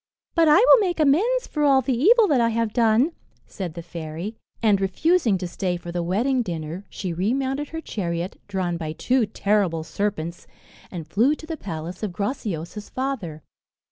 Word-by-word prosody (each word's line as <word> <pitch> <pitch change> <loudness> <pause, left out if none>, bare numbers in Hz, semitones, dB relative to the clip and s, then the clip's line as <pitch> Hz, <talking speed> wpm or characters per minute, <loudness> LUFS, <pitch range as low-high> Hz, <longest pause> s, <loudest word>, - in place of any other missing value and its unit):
"But 330 -2 +4
I 300 - +7
will 475 +5 +7
make 360 -5 0
amends 400 - +3
for 300 - -4
all 270 -2 +5
the 260 0 0
evil 425 - +5
that 270 -5 +3
I 230 - +3
have 230 -1 -1
done," 235 +5 +3 0.3
said 180 -6 -6
the 170 - -6
fairy; 170 +5 -6 0.2
and, 210 -4 +3
refusing 225 - +2
to 180 -1 -4
stay 180 0 -2
for 175 0 -8
the 175 0 -2
wedding 235 +10 +1
dinner, 170 -1 -5
she 185 -4 -4
remounted 265 - -1
her 320 0 -5
chariot, 175 - -4
drawn 185 -3 -2
by 155 -2 -4
two 245 +6 +1
terrible 200 -6 0
serpents, 170 0 -3 0.4
and 165 -4 -7
flew 235 - +3
to 315 - -11
the 325 0 -4
palace 175 - -6
of 210 -5 -3
Graciosa's 205 - -4
father. 215 - -4
210 Hz, 175 wpm, -24 LUFS, 175-270 Hz, 0.4 s, I